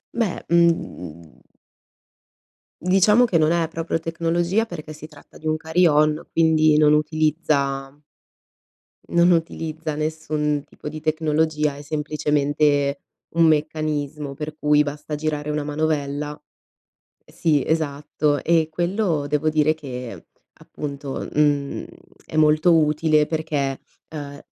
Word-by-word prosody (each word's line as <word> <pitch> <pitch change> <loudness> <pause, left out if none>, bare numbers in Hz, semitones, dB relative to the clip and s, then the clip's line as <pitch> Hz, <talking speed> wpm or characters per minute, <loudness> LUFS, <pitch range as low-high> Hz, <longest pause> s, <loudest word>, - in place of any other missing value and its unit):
Beh, 220 -7 -1
mhmm 90 - 0 1.4
diciamo 195 +6 +4
che 185 -8 +1
non 155 +1 +3
è 170 -1 +1
proprio 165 0 -2
tecnologia 170 +5 0
perché 155 -5 -8
si 155 +1 -10
tratta 145 -2 -17
di 155 - -7
un 155 - +2
carillon, 160 -1 +2
quindi 155 -2 +4
non 150 -1 +5
utilizza 150 -3 0 1.2
non 170 +1 +4
utilizza 160 -2 -1
nessun 150 -1 -2
tipo 150 - -9
di 155 0 -7
tecnologia, 155 -1 0
è - - -10
semplicemente 145 -1 0 0.4
un 165 - +5
meccanismo 150 -2 -1
per 155 +2 -6
cui 150 0 +4
basta 150 +1 -5
girare 150 0 -3
una 150 -1 -1
manovella 150 -1 -2 0.9
e - - -21
sì, 150 -4 +1
esatto. 150 -2 -1
E 165 -2 +3
quello 175 -3 -1
devo 150 +2 +1
dire 155 0 +2
che 125 - -8 0.3
appunto, 140 -2 -6
mhmm, 145 -2 +1 0.4
è - - -9
molto 155 +2 +4
utile 155 0 +3
perché, 150 -4 -2 0.4
uhm 145 -1 -7
155 Hz, 115 wpm, -22 LUFS, 145-160 Hz, 1.4 s, non